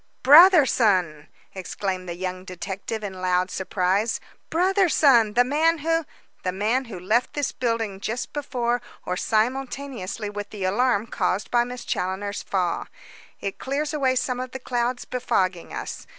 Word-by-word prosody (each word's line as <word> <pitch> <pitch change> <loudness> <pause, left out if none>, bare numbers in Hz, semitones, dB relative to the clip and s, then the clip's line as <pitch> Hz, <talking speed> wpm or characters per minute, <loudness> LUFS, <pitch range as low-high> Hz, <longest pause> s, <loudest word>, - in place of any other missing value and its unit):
"Brotherson!" 250 - +6 0.3
exclaimed 185 -1 -4
the 170 - -4
young 185 0 -4
detective 190 +4 -5
in 190 -2 -6
loud 180 0 +1
surprise. 190 +4 0 0.3
"Brotherson! 320 - +4
The 245 - +6
man 315 +6 +2
who 325 +1 0 0.2
" - - -38
"The 185 - 0
man 220 +8 0
who 210 -6 -8
left 220 +7 +1
this 290 -2 -1
building 230 -5 -2
just 230 +5 -4
before 245 -4 -1 0.2
or 180 - -1
simultaneously 235 -1 -2
with 205 0 -6
the 205 -3 -6
alarm 215 +3 +2
caused 195 -3 -1
by 240 -1 +4
Miss 245 0 -7
Challoner's 195 +2 -2
fall. 180 -3 -1 0.5
It 195 - -4
clears 290 +3 -2
away 265 -3 +1
some 250 0 -1
of 255 0 -5
the 265 - -5
clouds 245 0 -2
befogging 185 -8 -1
us. - - -6
225 Hz, 150 wpm, -24 LUFS, 190-260 Hz, 0.5 s, Brotherson